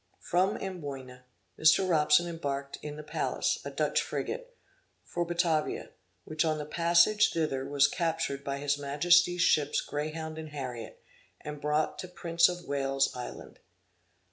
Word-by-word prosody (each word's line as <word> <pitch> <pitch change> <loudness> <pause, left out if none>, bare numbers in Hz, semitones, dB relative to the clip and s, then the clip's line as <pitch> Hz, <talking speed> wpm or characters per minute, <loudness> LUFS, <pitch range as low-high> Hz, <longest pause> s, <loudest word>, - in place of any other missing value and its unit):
From 185 +2 +1
Amboyna, 135 -9 -7 0.3
Mr. 160 +4 +5
Robson 160 0 +4
embarked 140 -4 -4
in 150 -1 -6
the 150 - -8
Pallas - - -1
a - - -5
Dutch - - 0
frigate, - - -5 0.5
for 175 - -2
Batavia, 170 -2 0 0.3
which 155 +1 0
on 155 -1 0
the 150 - -4
passage 170 +6 +4
thither 140 -5 -1
was 140 -1 +4
captured 160 -3 -2
by 140 0 -3
his 145 0 -1
Majesty's 175 +5 +3
ships 150 -4 +3
Greyhound 155 +2 -4
and 155 -1 -7
Harriet, 125 -6 -7 0.4
and 150 -1 -7
brought 150 +1 0
to 185 - -5
Prince 170 -1 +2
of 175 0 -6
Wales's 135 -1 0
island. 125 - -8
155 Hz, 140 wpm, -30 LUFS, 140-170 Hz, 0.5 s, Mr